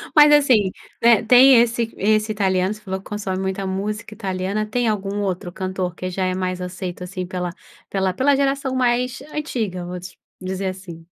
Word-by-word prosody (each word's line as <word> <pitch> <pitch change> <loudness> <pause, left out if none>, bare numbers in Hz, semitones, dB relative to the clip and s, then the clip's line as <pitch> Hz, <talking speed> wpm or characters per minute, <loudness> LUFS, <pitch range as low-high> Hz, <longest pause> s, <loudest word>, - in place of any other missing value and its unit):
Mas 295 0 +8
assim, 255 -10 +5 0.3
eh, 235 -1 +5
tem 250 +2 +7
esse 235 -1 0
esse 215 +1 +2
italiano, 190 -1 +1
se 215 - -13
falou 190 -1 -4
que - - -19
consome 200 -3 -3
muita 190 0 -2
música 210 +3 -4
italiana, 195 0 -2
tem 240 +2 0
algum 205 -1 -1
outro 185 -2 -3
cantor 185 -1 -3
que 185 - -4
já 185 +1 -1
é 185 0 0
mais 185 -1 -2
aceito 180 0 -5
assim 185 0 -5
pela 180 -1 -3 0.4
pela 190 -1 0
pela 275 +6 +3
geração 275 -1 0
mais 250 0 +1
antiga, 220 - -3
vamos 180 +1 -7 0.2
dizer 190 +1 -3
assim. 180 -3 -7
195 Hz, 175 wpm, -21 LUFS, 185-230 Hz, 0.4 s, Mas